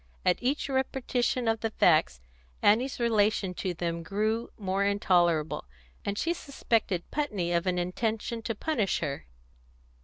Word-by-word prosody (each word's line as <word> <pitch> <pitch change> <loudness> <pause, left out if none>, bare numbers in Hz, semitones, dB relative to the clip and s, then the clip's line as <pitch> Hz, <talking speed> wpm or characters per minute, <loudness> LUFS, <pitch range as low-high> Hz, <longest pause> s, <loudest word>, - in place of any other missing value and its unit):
At - - +3
each 270 +4 0
repetition 260 -2 0
of 225 0 +2
the 225 - -1
facts, - - +3 0.4
Annie's 245 +6 +3
relation 215 -5 +2
to 180 0 -3
them 170 0 -2
grew 215 +6 -1
more 195 -1 0
intolerable; 175 - +2 0.4
and 200 0 -2
she 335 +8 +1
suspected 225 - -1
Putney 210 - -1
of 170 +1 +1
an 180 -1 +1
intention 220 +6 -2
to 230 0 -3
punish 220 - 0
her. 140 - -4
210 Hz, 140 wpm, -29 LUFS, 180-235 Hz, 0.4 s, At